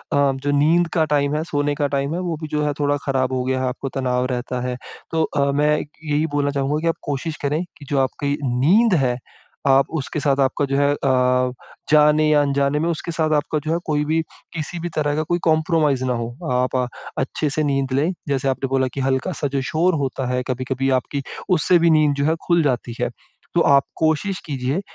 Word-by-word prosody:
जो 140 0 +1
नींद 160 +4 +3
का 160 -3 +3
टाइम 145 0 +1
है 155 - -1
सोने 145 -2 -1
का 145 0 0
टाइम 140 +1 -1
है 175 - -2
वो 175 -3 -2
भी 155 - -4
जो 150 0 0
है 145 - 0
थोड़ा 145 0 +1
ख़राब 130 -2 0
हो 130 -1 0
गया 130 0 0
है 130 - 0
आपको 130 +2 -4
तनाव 125 -1 -1
रहता 125 0 -3
है। 125 - -2 0.4
तो 160 -1 +1
अ, 140 -2 0
मैं 150 +2 +2
इक - - -7
यही 150 0 +1
बोलना 145 -1 +1
चाहूँगा 140 +2 0
कि 165 - -1
आप 165 - +2
कोशिश 145 +2 -3
करें 150 +4 0
कि 145 - -12
जो 140 -3 +1
आपकी 140 +2 -1 0.2
नींद 200 - +4
है 125 -1 +1 0.5
आप 135 0 +4
उसके 150 +1 -3
साथ 140 -1 +1
आपका 135 +2 0
जो 135 0 -1
है 145 0 +3
अ, 125 -2 +2 0.4
जाने 150 0 +5
या 150 -1 +5
अनजाने 140 0 +1
में 165 +2 0
उसके 170 +1 -3
साथ 160 -1 0
आपका 150 +1 0
जो 155 - -1
है - - +1
कोई 150 -1 0
भी 160 +2 +1 0.3
किसी 165 +2 -4
भी 175 +1 -4
तरह 145 -1 0
का 155 - 0
कोई 175 +3 -1
कंप्रोमाइज़ 155 -4 +2
ना 125 - +1
हो। 115 -1 -3 0.2
आप 125 +1 0 0.4
अच्छे 145 +3 -1
से 155 +2 0
नींद 135 -2 0
लें 150 +7 +2 0.2
जैसे 135 -1 0
आपने 135 +1 -1
बोला 130 -1 +1
कि 140 - -4
हल्का-सा 135 +4 -1
जो 135 - +1
शोर 175 +4 +2
होता 135 0 -2
है 125 - 0
कभी-कभी 130 +1 -1
आपकी 140 +2 -5 0.3
उससे 180 +1 +4
भी 170 0 +4
नींद 155 -2 +4
जो 140 0 0
है 160 +2 +2
ख़ुल 170 -2 +3
जाती 125 -4 -1
है। - - +1 0.5
तो - - +4
आप 140 -1 +5
कोशिश 160 +5 0
कीजिए 135 +1 -2
145 Hz, 220 wpm, -21 LUFS, 135-155 Hz, 0.5 s, जाने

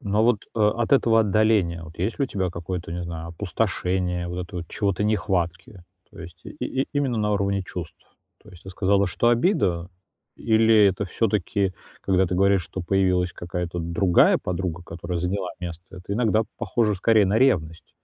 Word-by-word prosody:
Но, 100 +1 -1
а - - +4
вот, 120 -1 +4 0.2
э, - - -4
от 110 +4 +1
этого 115 -4 +5
отдаления, 105 -5 +2
вот, 80 0 -12
есть 100 +9 -2
ли 140 - +2
у - - -4
тебя 95 -6 -2
какое-то, 85 0 -5
не 90 0 -4
знаю, 85 -1 -6
опустошение, 90 -1 -2
вот 90 0 -4
это 90 - -9
вот 85 -1 -6
чего-то 100 -2 -1
нехватки? 95 -3 -1 0.3
То - - -13
есть 85 +2 -11
и - - -8 0.3
и - - -6
именно 135 -5 0
на 105 0 0
уровне 100 -1 0
чувств? - - -7 0.5
То - - -16
есть 90 -1 -15
ты 95 - -9
сказала, 100 +1 +2
что 120 +5 +1
обида, 115 - +1 0.5
или 110 -1 +4
это 95 +1 0
всё-таки, 100 -1 0 0.3
когда 95 -1 +2
ты 90 - -2
говоришь, 100 -1 +3
что 95 - -7
появилась 90 0 +1
какая-то 85 0 -4
другая 85 +2 +3
подруга, 90 -1 -4
которая 85 +1 -5
заняла 90 +1 -2
место, 85 -2 -7
это 90 +2 -7
иногда 110 -1 +2
похоже 110 -3 0
скорее 105 +2 +3
на 100 +4 +2
ревность? 85 -11 +1
95 Hz, 185 wpm, -24 LUFS, 90-105 Hz, 0.5 s, этого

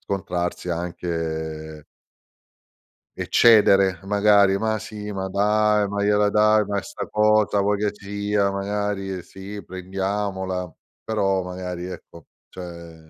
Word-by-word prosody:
scontrarsi 90 -2 -3
anche 80 -3 -4 1.3
eccedere 100 -5 +5
magari: 100 -1 +4
"Ma 110 +1 -1
sì, 105 -1 -7
ma 95 -1 -3
dai, 105 +1 +2
ma 100 0 -3
gliela 105 0 +3
dai 105 0 +4
ma 100 0 -2
'sta - - -7
cosa 105 -1 +3
vuoi 105 +1 +1
che 105 +1 0
sia 100 0 -1
magari 100 -1 -3
sì 100 +2 -9
prendiamola." 95 0 -3 0.3
Però, 95 -4 0
magari 90 -1 -5
ecco, 85 -2 -10 0.2
cioè 85 -2 -9
100 Hz, 110 wpm, -23 LUFS, 90-105 Hz, 1.3 s, eccedere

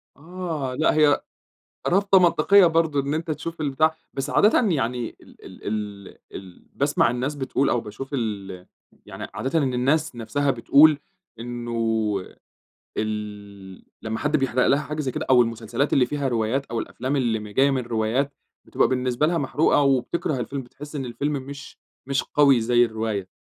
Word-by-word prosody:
آه، 160 -4 -5
لأ، 155 - +2
هي 150 -2 +4 0.7
رابطة 195 +1 +4
منطقيّة 180 +2 +5
برضو 160 -3 +2
إن 140 +1 -1
أنت 160 0 -2
تشوف 165 +1 -5
البتاع 155 +2 +1 0.2
بس 135 +2 -3
عادةِ 215 +5 +4
يعني 125 -5 -2
ال - - -18
ال - - -11
ال 105 -2 -5 0.2
ال 95 -2 -11
باسمع 140 -3 +2
الناس 130 +4 -2
بتقول 135 0 0
أو 120 - +1
باشوف 120 +6 -8
ال 100 -7 -4 0.4
يعني - - -8
عادةً 135 +5 -1
إن 130 -3 0
الناس 140 +3 +1
نفسها 140 +5 0
بتقول 145 +5 +5 0.4
إنّه 115 -4 -2 0.7
ال 105 -3 -6 0.2
لمّا 110 0 -4
حد 150 +1 +1
بيحرق 130 -2 +1
لها 140 +2 +3
حاجة 150 +1 -4
زي 130 - -2
كده، - - -4
أو 125 -1 +7
المسلسلات 115 +4 -1
اللي 130 - +4
فيها 140 +2 -2
روايات 120 +3 0
أو 115 - -3
الأفلام 130 +5 -3
اللي 120 -5 0
م 105 - -8
جايّة 135 +7 +2
من 130 -2 0
روايات، 120 +4 -1 0.3
بتبقى - - +2
بالنسبة 125 +2 0
لها 170 +1 +1
محروقة 145 +1 +2
وبتكره 135 +2 0
الفيلم، 135 +3 -4
بتحس 145 +5 -11
إن 135 - -3
الفيلم 135 +5 -2
مش 140 0 -8 0.3
مش 140 0 0
قوي 140 -5 +4
زي 120 +1 +4
الرواية، 110 -4 -3
130 Hz, 165 wpm, -24 LUFS, 115-145 Hz, 0.7 s, أو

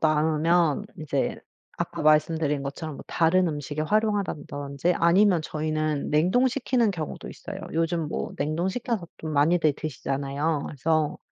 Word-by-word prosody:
남으면 160 +3 +2
이제 140 -3 -1 0.4
아까 - - -3
말씀드린 155 -1 +3
것처럼 145 +3 -5
뭐 - - -10
다른 170 +2 +3
음식에 145 0 -4
활용한다든지 175 -6 0
아니면 175 +1 +4
저희는 155 -1 -2
냉동시키는 240 - +2
경우도 160 -4 -5
있어요. - - -8 0.2
요즘 165 -1 0
뭐 - - -3
냉동시켜서 180 - -1
또 160 - -6
많이들 155 +1 +3
드시잖아요. 140 +1 -2
그래서 155 +1 0
155 Hz, 335 characters per minute, -26 LUFS, 150-175 Hz, 0.4 s, 아니면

